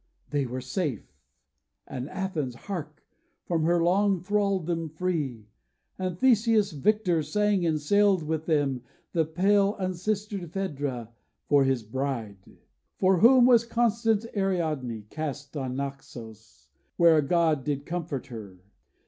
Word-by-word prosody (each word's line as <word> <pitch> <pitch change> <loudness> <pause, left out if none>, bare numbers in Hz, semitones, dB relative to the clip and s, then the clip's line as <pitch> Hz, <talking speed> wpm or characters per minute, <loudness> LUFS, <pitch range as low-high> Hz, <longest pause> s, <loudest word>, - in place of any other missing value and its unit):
They 140 -3 0
were 130 +2 -5
safe, 130 - -3 0.7
And 130 +1 -6
Athens, 160 -10 -3
hark! 155 - -7 0.4
from 165 -2 0
her 170 0 +3
long 195 +2 +3
thraldom 180 -4 -1
free! 150 - -3 0.5
And 185 -2 -2
Theseus, 225 -3 +3
victor, 180 +1 +1
sang 205 +1 +1
and 155 -1 +1
sailed 200 +3 +3
with 155 0 -3
them, 145 -5 +1 0.3
The 165 -2 +2
pale 195 +5 +2
unsistered 190 -1 -3
Phædra 140 - -3 0.4
for 145 -2 +4
his 135 -3 0
bride, 115 -3 -3 0.6
For 190 -1 +3
whom 245 +4 +7
was 240 -2 +6
constant 230 -2 +1
Ariadne 155 - -1
cast 145 -2 -5
On 130 -3 -3
Naxos, 120 -6 -8 0.3
where 170 -2 +6
a - - +4
god 160 -2 +2
did 145 0 -2
comfort 170 -6 -4
her. 105 -6 -9
165 Hz, 125 wpm, -27 LUFS, 140-195 Hz, 0.7 s, whom